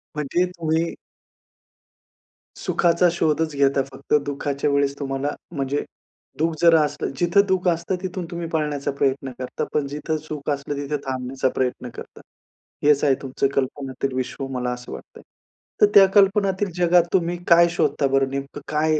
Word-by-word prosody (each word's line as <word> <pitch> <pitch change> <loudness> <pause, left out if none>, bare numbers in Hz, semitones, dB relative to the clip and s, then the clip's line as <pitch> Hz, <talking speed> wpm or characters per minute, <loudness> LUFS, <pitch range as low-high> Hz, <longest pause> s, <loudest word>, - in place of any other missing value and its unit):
म्हणजे 150 +5 0
तुम्ही 165 0 0 1.6
सुखाचा 170 0 +2
शोधच 160 -2 0
घेता 140 -1 +3
फक्त. 135 +1 -7
दुःखाच्या 140 0 -2
वेळेस 140 0 +1
तुम्हाला 135 0 -2 0.3
म्हणजे 140 +1 -1 0.5
दुःख 160 +1 +1
जरा 165 -2 +6
असलं 150 - -2
जिथं 175 +3 +4
दुःख 190 -1 +1
असतं 170 +2 -1
तिथून 185 -1 -4
तुम्ही 170 -1 -4
पाळण्याचा 150 -3 -1
प्रयत्न 135 -1 -1
करता, 130 0 -4
पण 145 -2 0
जिथं 150 +2 -3
सुख 155 -1 -6
असलं 140 +1 -3
तिथे 145 +1 -2
थांबण्याचा 130 0 -1
प्रयत्न 125 -1 -2
करता. - - -10 0.6
हेच 145 -1 +4
आहे 135 -2 +4
तुमचं 135 0 -1
कल्पनातील 135 0 -2
विश्व 130 +1 -3
मला 125 -1 -2
असं 125 0 -9
वाटतं - - -10
आहे. - - -16 0.6
तर 210 - +8
त्या 195 - +10
कल्पनातील 195 0 +3
जगात 175 -1 +4
तुम्ही 175 -1 +1
काय 170 0 +7
शोधता 170 -4 +1
बरं 135 0 +2
नेमकं 140 +1 -5
काय, 155 0 +1
145 Hz, 150 wpm, -23 LUFS, 135-170 Hz, 1.6 s, त्या